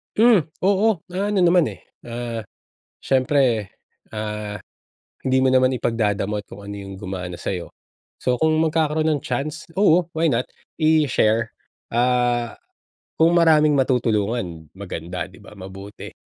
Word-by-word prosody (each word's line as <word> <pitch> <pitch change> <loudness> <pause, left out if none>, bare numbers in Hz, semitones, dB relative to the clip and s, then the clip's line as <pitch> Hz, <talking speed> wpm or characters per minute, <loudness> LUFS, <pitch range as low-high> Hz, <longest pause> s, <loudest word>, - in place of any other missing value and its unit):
Hmm, 220 - +5 0.2
oo, 200 -1 +2
ah, 185 +3 -2
ano 195 - +2
naman, 175 -1 +5
eh, 90 - -17 0.2
ah, 115 -2 -5 0.6
siyempre, 130 -5 +2 0.5
ah, 105 -1 -5 0.6
hindi 130 0 +1
mo 130 - +3
naman 130 0 +5
ipagdadamot 105 -3 -1
kung 100 - -11
ano 100 - -7
yung 95 -1 -8
gumana 90 -2 -6
sa'yo. 90 -2 -4 0.5
So 125 -1 -1
kung 160 0 +3
magkakaroon 155 -1 +1
ng 155 -3 +1
chance, 140 +5 -4
oo, 180 -3 +4
why 160 -3 +2
not 120 +2 -1 0.3
i-share, 130 -8 +2 0.4
ah, 120 -1 +1 0.6
kung 165 +1 +4
maraming 155 -3 +5
matutulungan, 110 - 0
maganda 90 -2 -5
di 90 -1 -16
ba, 105 - -14
mabuti. 95 +2 -10
125 Hz, 130 wpm, -22 LUFS, 105-155 Hz, 0.6 s, Hmm